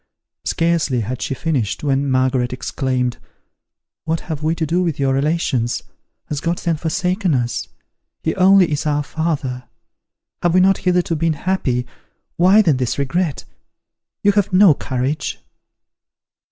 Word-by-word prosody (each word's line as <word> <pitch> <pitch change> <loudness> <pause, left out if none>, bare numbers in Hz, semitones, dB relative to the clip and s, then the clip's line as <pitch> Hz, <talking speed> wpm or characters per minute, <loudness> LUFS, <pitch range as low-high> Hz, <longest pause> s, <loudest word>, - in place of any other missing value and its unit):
Scarcely 165 -7 +1
had 120 +3 -4
she 135 - -2
finished, 135 -9 -2
when 140 -1 +1
Margaret 130 -1 +1
exclaimed, 125 -1 -2 0.9
"What 165 0 -1
have 155 -4 -5
we 160 +2 0
to 160 - -1
do 170 +4 +1
with 165 -5 -1
your 135 -1 +2
relations? 135 -5 0 0.4
Has 150 -1 -4
God 170 +1 -1
then 170 -1 -1
forsaken 180 +2 0
us? 120 -2 -2 0.6
He 160 - 0
only 190 -2 +5
is 150 +1 -1
our 150 0 +1
father! 140 -5 -3 0.8
Have 175 0 +2
we - - +6
not 190 +1 +4
hitherto 180 -2 +1
been 165 +1 +1
happy? 145 -7 -1 0.5
Why 190 +5 +5
then 155 -8 +3
this 125 -2 -1
regret? 150 +2 -1 0.8
You 205 - +5
have 205 -1 +1
no 185 -2 +7
courage." 135 +2 -3
155 Hz, 140 wpm, -19 LUFS, 130-175 Hz, 0.9 s, no